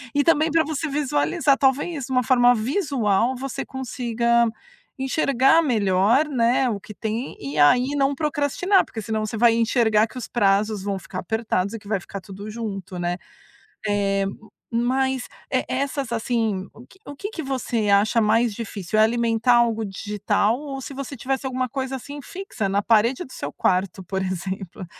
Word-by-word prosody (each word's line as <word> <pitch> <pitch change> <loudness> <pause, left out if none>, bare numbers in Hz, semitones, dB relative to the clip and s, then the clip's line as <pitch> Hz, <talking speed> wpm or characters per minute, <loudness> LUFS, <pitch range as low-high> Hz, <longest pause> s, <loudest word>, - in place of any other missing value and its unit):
e 285 - +4
também 320 -1 +3
para 325 +1 +4
você 315 +1 -3
visualizar. 275 - +1
Talvez, 275 +1 0
uma 255 -1 +2
forma 245 0 +5
visual, 245 - +1
você 270 0 -4
consiga 235 -2 0 0.5
enxergar 270 +2 +3
melhor, 215 - +3
né, 250 -1 +2
o 210 -4 -2
que 210 - -12
tem 225 +5 -4
e 140 +1 -6
aí 245 - +5
não 275 0 +2
procrastinar. 305 +6 +1
Porque 220 - -7
senão 215 0 -2
você 215 +1 -4
vai 235 0 +5
enxergar 225 -2 +3
que 255 - -12
os 245 - -5
prazos 205 -1 +1
vão 200 -1 -2
ficar 185 0 -7
apertados 200 0 -1
e 225 - -5
que 200 - -16
vai 205 -3 0
ficar 195 +2 -8
tudo 200 +3 -9
junto, 200 -5 -5
né. 175 0 -1 0.7
Eh, 195 -1 +1 0.5
mas 260 +2 0 0.2
e 255 - +1
essas, 270 -1 -2
assim 225 -4 -1
o 235 - -13
que 380 - -21
o 285 - -8
que 405 +8 -5
que 330 - -5
você 240 -5 -1
acha 205 +4 +4
mais 225 +1 +2
difícil: 215 -2 -3
é - - +7
alimentar 230 +1 +2
algo 230 -2 +2
digital 205 +3 0
ou 280 -2 -6
se 275 - -7
você 275 +1 -6
tivesse 265 +3 -2
alguma 255 0 -1
coisa, 265 0 -3
assim, 285 +3 -9
fixa 370 - -4
na 200 +1 +1
parede 230 +4 +3
do 260 - -16
seu 145 - -5
quarto, 185 0 0
por 190 +2 -3
exemplo 185 0 -5
235 Hz, 175 wpm, -23 LUFS, 205-270 Hz, 0.7 s, é